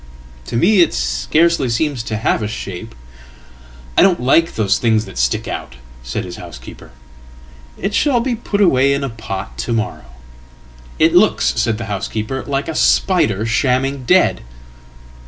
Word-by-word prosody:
""To - - -5
me 190 - +4
it 170 - +2
scarcely 130 - +1
seems 135 +2 -1
to 110 - -3
have 110 - 0
a 105 - -2
shape.""I 60 - -7
don't 185 -2 +4
like 165 +7 +2
those 105 -2 +1
things 110 -2 +1
that - - -12
stick 65 0 0
out," - - -6 0.3
said - - -4
his 90 - -8
housekeeper."It 65 - -11
shall 270 -1 +2
be 245 +1 -1
put 210 -2 -2
away 140 -7 +4
in 140 - -3
a 135 - -2
pot 110 -4 -7
to 120 - -2
morrow.""It 65 - -4
looks," 190 +5 +3
said 110 -3 0
the 115 - -5
housekeeper, 110 +5 -4
"like 140 0 -2
a - - -3
spider 60 - +2
shamming 130 +3 0
dead." - - +3
110 Hz, 145 wpm, -17 LUFS, -, 0.3 s, me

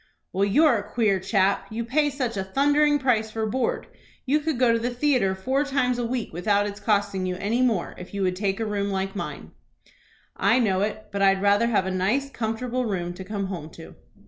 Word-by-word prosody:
"Well, 195 +2 +2
you're 275 +5 +4
a 205 +1 -10
queer 210 -5 +2
chap. 195 0 +1
You 225 +1 -4
pay 295 +5 +2
such 255 -5 -3
a 195 - -2
thundering 290 +8 +3
price 240 -5 +1
for 220 0 -2
board. 235 +3 -1 0.4
You 285 +3 +2
could 310 -2 -2
go 240 -2 +4
to 230 - +1
the 240 +2 -1
theatre 245 -7 +1
four 260 +9 0
times 255 -3 0
a - - -1
week 240 -4 -3
without 200 +4 +1
its 205 0 -5
costing 200 -3 0
you 180 - -2
any 210 +6 -1
more, 225 -9 +1
if 180 - -10
you 200 -1 -2
would 185 -1 +1
take 195 +1 -1
a 225 - -1
room 200 -1 -1
like 195 0 -2
mine." 200 - -6 0.8
"I 230 - +3
know 195 -6 +2
it; 215 +1 -3
but 200 - -3
I'd 195 0 +3
rather 205 +3 +4
have 210 -5 +1
a 190 - -2
nice, 215 +10 0
comfortable 240 +2 -2
room 175 -5 -2
to 190 +2 -8
come 200 +1 -3
home 175 -5 -6
to." 165 - -11
215 Hz, 220 wpm, -25 LUFS, 195-250 Hz, 0.8 s, you're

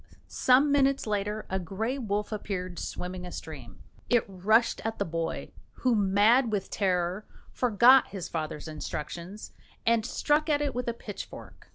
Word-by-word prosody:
Some 265 +3 +4
minutes 275 -1 +3
later 210 0 -2
a 190 - -2
grey 220 +9 -3
wolf 210 -3 -2
appeared, 185 -4 -4
swimming 180 0 -5
a 180 - -7
stream. 130 - -9 0.3
It 240 -2 +3
rushed 210 +5 +2
at 225 0 -3
the 200 - -1
boy, 165 0 -3 0.2
who, 255 -2 +1
mad 215 +4 +4
with 205 -3 -2
terror, 185 0 0 0.2
forgot 250 +2 +5
his 190 -4 -6
father's 155 -1 -4
instructions, 170 +6 -6 0.3
and 230 -1 +3
struck 300 +6 +1
at 290 -1 +3
it 290 -2 -1
with 250 +1 -3
a 235 - 0
pitchfork. - - -9
210 Hz, 155 wpm, -28 LUFS, 180-240 Hz, 0.3 s, forgot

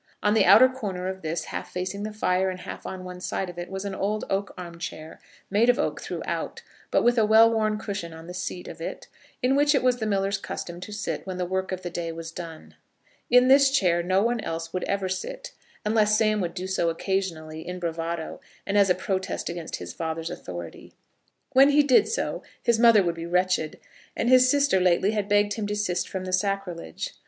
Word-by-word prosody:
On 210 - +3
the 220 - +4
outer 255 +4 +8
corner 205 -8 -4
of 190 0 -5
this, 160 +1 -2
half - - -6
facing 185 +2 -4
the 215 +1 -4
fire, 190 -3 +1
and 185 -1 -6
half - - -7
on 185 -1 -6
one 180 0 -8
side 185 0 -3
of 175 - -10
it, 175 - -6
was 190 +1 -5
an 200 - -3
old 210 +3 -2
oak 195 0 -1
arm 170 -2 -8
chair, 160 -2 -7 0.3
made 220 +4 +4
of 245 - +4
oak - - -1
throughout, - - -4 0.3
but - - +2
with 240 0 +4
a 220 - +4
well 225 +1 +6
worn 215 -1 +1
cushion 200 -5 -5
on 160 0 -11
the 180 - -8
seat 180 0 -5
of - - -9
it, - - -6 0.4
in 260 +2 +3
which 290 +1 +4
it 275 - +2
was 250 -1 +3
the 220 -2 -2
miller's 195 -1 0
custom 175 -2 -6
to 185 - -8
sit 205 -1 -4
when 185 -1 -4
the 180 - -1
work 190 +1 -2
of 185 0 -4
the 175 - -4
day 165 -1 -3
was 165 0 -7
done. 165 -2 -9 0.6
In 250 +1 +6
this 275 +1 +7
chair 180 -10 +2
no 185 +3 +2
one 235 +1 +1
else 165 -2 -5
would 185 - -2
ever 195 -1 -1
sit, - - -5 0.3
unless 215 0 +3
Sam 215 -1 +2
would 175 -1 -3
do 185 0 -4
so 190 -3 0
occasionally, 165 -3 -3
in 180 0 -4
bravado, 165 -1 -4 0.2
and 205 +1 +2
as 200 -1 +5
a 180 - +4
protest 190 -1 -3
against 170 -2 -5
his 90 0 -7
father's 165 0 -4
authority. 85 -2 -8 0.6
When 270 +2 +7
he 295 +1 +5
did 270 -3 +5
so 465 - -2 0.2
his 235 -1 +2
mother 230 -4 +7
would 170 -1 0
be 165 0 -6
wretched, 180 -3 +1 0.4
and 235 - +1
his 255 0 +6
sister 280 -7 +3
lately 180 +2 +3
had 210 -2 -2
begged 205 0 +3
him 210 -1 -3
to 210 - -2
desist 195 -4 -1
from 190 -1 -4
the 185 - -4
sacrilege. 185 - -2
190 Hz, 220 wpm, -26 LUFS, 175-215 Hz, 0.6 s, outer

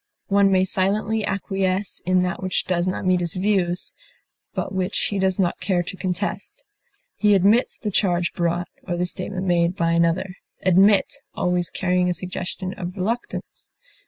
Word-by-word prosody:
One 200 0 +4
may 185 0 +4
silently 205 +4 0
acquiesce 195 0 -1
in 185 0 +3
that 180 +1 -2
which 185 -1 -1
does 180 -1 0
not 185 - -2
meet 185 -1 +3
his 175 0 -2
views, 185 -2 0 0.6
but - - -3
which 190 +1 -1
he 200 - -1
does 190 -1 +1
not 180 -3 0
care 180 -3 0
to 185 +2 -7
contest. 190 +1 -3 0.6
He 210 -1 +5
admits 205 +6 +3
the 210 - -3
charge 175 -3 +1
brought, 175 0 -1
or 175 -2 -3
the 180 - +1
statement 185 +1 -4
made, 175 -1 +2
by 165 -2 +1
another 170 +3 +1 0.3
admit 195 +2 +4 0.2
always 180 -1 0
carrying 180 -1 +1
a - - +1
suggestion 185 +1 -4
of 180 +1 -5
reluctance. 225 +6 -4
185 Hz, 160 wpm, -23 LUFS, 180-195 Hz, 0.6 s, He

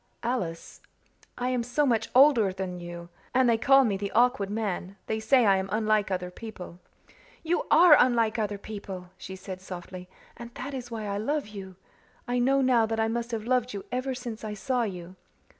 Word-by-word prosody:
"Alice 205 -9 -4 0.6
I 250 +1 -1
am 250 -1 0
so 245 +5 0
much 230 -4 +1
older 255 -7 +6
than 185 -1 -5
you 175 0 -8 0.3
and 260 -1 +4
they 235 - +4
call 270 +3 +6
me 205 -6 0
the 200 0 -4
Awkward 240 -5 +3
Man 200 -3 -3
they 220 - -2
say 250 +2 +4
I 195 -2 +5
am 190 0 -3
unlike 215 -1 +1
other 180 -1 -3
people" 180 -4 -9 0.6
"You 340 +2 -1
ARE 335 -2 +8
unlike 235 -2 +2
other 210 -1 -2
people," 195 -3 -8
she 190 0 -9
said 185 0 -8
softly, 180 -1 -9 0.3
"and 235 -1 -9
that 280 +3 -6
is 250 -2 -6
why 225 -2 -5
I 200 0 -2
love 285 +2 -2
you. 195 -3 -9 0.5
I 245 0 0
know 270 +3 +3
now 245 -4 +3
that 225 0 -2
I 220 0 +1
must 235 +1 -3
have 225 -3 -3
loved 250 -1 0
you 200 - -6
ever 255 +1 -2
since 240 -4 -7
I 210 -1 -4
saw 250 +5 -1
you." 185 -4 -5
220 Hz, 195 wpm, -27 LUFS, 190-245 Hz, 0.6 s, ARE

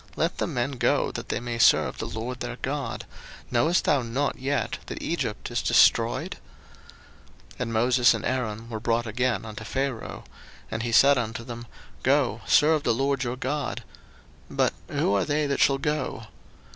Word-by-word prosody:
let 165 +1 -1
the - - 0
men 135 -4 -1
go, 130 - +1
that - - -7
they - - -1
may 120 0 -4
serve - - +4
the - - -3
LORD 120 +3 -5
their 120 0 -4
God: 135 -3 -3 0.5
knowest 155 +9 +3
thou 145 -3 +3
not 130 +5 -2
yet 140 +2 -1
that - - -5
Egypt 135 -10 -3
is - - 0
destroyed? - - +3 1.1
02:010:008 - - -18
And 115 -2 -2
Moses 120 +2 +4
and - - -5
Aaron 115 -3 -2
were 110 -2 -5
brought 115 +1 0
again 115 -1 -1
unto 110 -2 -7
Pharaoh: 135 -3 -3 0.5
and 110 - -2
he 120 0 -2
said 140 +3 +6
unto 115 0 -4
them, 120 0 -8 0.3
Go, 130 -5 +2
serve 150 +9 +5
the 120 -4 +1
LORD 135 +1 0
your 125 0 -3
God: 140 +1 -3 0.7
but - - +1
who - - 0
are 100 -2 +2
they 150 +1 0
that 140 -1 -1
shall 135 - +4
go? 150 -4 -2
125 Hz, 170 wpm, -26 LUFS, 115-140 Hz, 1.1 s, said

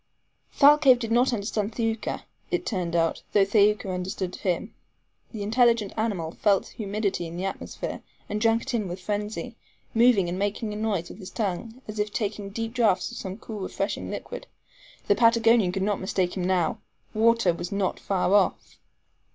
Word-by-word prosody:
Thalcave 285 -2 +7
did 230 -2 -4
not 245 +3 +4
understand 210 -1 -2
Thaouka, 225 -2 -2 0.3
it - - -1
turned 180 -5 -2
out, 165 -1 +1
though 200 -1 +5
Thaouka 205 -1 +3
understood 180 0 -3
him. 195 +4 -2 0.6
The 215 -3 -5
intelligent 230 -1 +3
animal 200 -8 -1
felt 200 +1 +1
humidity 200 -4 -2
in 165 +1 -7
the 185 - -2
atmosphere 195 - -5 0.3
and 210 +1 -3
drank 225 0 +3
it - - -5
in 215 -4 0
with 175 +1 -5
frenzy, 210 +5 -4 0.4
moving 230 -5 +4
and 175 +2 -3
making 210 +2 -2
a - - -5
noise 210 -5 -1
with - - -11
his 190 -2 -8
tongue, 225 +5 -4
as 215 0 -6
if 210 0 0
taking 205 -1 -3
deep 225 +2 -4
draughts 215 -7 +2
of - - -8
some 190 0 -5
cool 220 -2 -8
refreshing 195 +1 -3
liquid. - - -6 0.6
The - - +4
Patagonian 230 -2 +4
could 190 +1 -2
not 205 0 0
mistake 185 -1 -1
him 185 -2 -2
now 180 -3 +1 0.3
water 225 -4 +3
was 175 +1 -6
not 200 -2 -1
far 190 -1 0
off. 205 -2 +1
205 Hz, 175 wpm, -26 LUFS, 190-225 Hz, 0.6 s, Thalcave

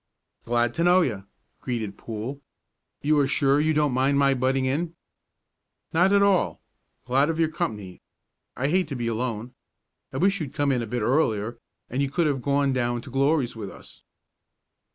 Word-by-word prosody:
"Glad 120 0 +1
to 170 - 0
know 180 +1 +5
you," 105 - -2 0.3
greeted 110 -5 -3
Poole. 115 +6 -6 0.6
"You 150 +1 +3
are 140 - +3
sure 140 0 +3
you 155 +1 +2
don't 150 -3 +2
mind 135 +2 +2
my 140 -1 +4
butting 130 +1 +1
in?" 160 +6 -1 1.0
"Not 180 +4 +4
at 200 0 +5
all. 200 -2 +2 0.5
Glad 135 +4 +2
of 165 - -1
your 160 -1 +3
company. 110 - -4 0.6
I 135 +3 0
hate 185 +3 +2
to 140 - -5
be 120 -2 -3
alone. 115 0 -3 0.6
I - - -5
wish 195 +1 +2
you'd 145 -1 -6
come 145 -2 +1
in 125 -2 +1
a 115 - -4
bit 120 0 -2
earlier, 115 -4 +1 0.3
and 130 +3 -2
you 140 - 0
could 170 +4 +1
have 140 -4 0
gone 140 0 +1
down 120 -1 -1
to 130 - -11
Glory's 135 -1 +1
with 105 -3 -6
us." - - -14
135 Hz, 180 wpm, -25 LUFS, 120-155 Hz, 1.0 s, know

